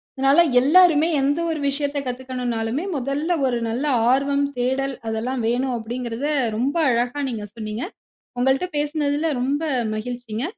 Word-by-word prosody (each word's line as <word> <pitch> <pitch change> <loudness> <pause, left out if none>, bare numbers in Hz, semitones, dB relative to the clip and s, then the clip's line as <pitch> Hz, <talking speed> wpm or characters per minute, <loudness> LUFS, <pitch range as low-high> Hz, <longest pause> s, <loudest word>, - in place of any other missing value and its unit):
அதனால 275 +5 +5 0.2
எல்லாருமே 320 +2 +5
எந்த 285 +4 +1
ஒரு 320 -2 -2
விஷயத்தக் 285 0 -2
கத்துக்கணும்னாலுமே 250 0 -3
முதல்ல 280 +6 -2 0.2
ஒரு 245 -2 0
நல்ல 240 +5 -2 0.3
ஆர்வம், 280 +2 +2
தேடல் 265 +2 0
அதெல்லாம் 230 +3 -2
வேணும் 250 +2 0
அப்டிங்கிறத 240 +3 -4 0.3
ரொம்ப 265 +6 0 0.2
அழகா 245 +4 0
நீங்கச் 210 -3 -6
சொன்னீங்க. 215 +1 -4 0.6
உங்கள்ட்ட 265 +8 +2
பேசினதுல 295 +1 0
ரொம்ப 280 +4 0 0.3
மகிழ்ச்சிங்க. 240 0 -4
265 Hz, 125 wpm, -22 LUFS, 240-285 Hz, 0.6 s, அதனால